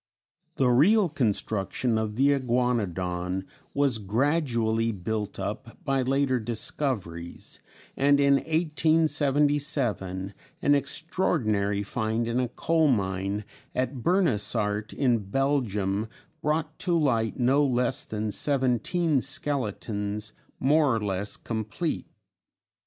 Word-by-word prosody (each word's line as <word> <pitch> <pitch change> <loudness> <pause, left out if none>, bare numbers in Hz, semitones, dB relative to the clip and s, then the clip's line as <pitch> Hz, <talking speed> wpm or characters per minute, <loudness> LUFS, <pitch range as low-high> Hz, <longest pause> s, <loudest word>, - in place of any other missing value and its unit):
] - - -48
The 130 - +2
real 180 - +5
construction 110 - 0
of 110 -1 -3
the 135 +4 +4
Iguanodon 95 -9 -1 0.3
was 140 -5 +2
gradually 115 - +1
built 105 +1 -4
up 105 +4 -5
by 135 -2 +1
later 130 0 +1
discoveries, 110 - -3 0.4
and 140 +1 +4
in 140 -1 +5
1877 145 - +1 0.3
an 145 - +5
extraordinary 110 - 0
find 110 +2 -1
in 115 +2 0
a 125 - +1
coal 160 +6 +1
mine 100 -3 0 0.3
at 130 +1 -1
Bernissart 105 - +1
in 125 -4 +2
Belgium 110 -6 0 0.3
brought 155 +1 -1
to 175 -2 +1
light 115 -8 +1
no 135 +3 +3
less 130 +1 +1
than 110 -4 -3
seventeen 140 - +1
skeletons 110 -6 -3 0.3
more 145 -2 +3
or - - 0
less 100 -1 -2
complete. 115 +9 -3
125 Hz, 105 wpm, -27 LUFS, 105-145 Hz, 0.4 s, real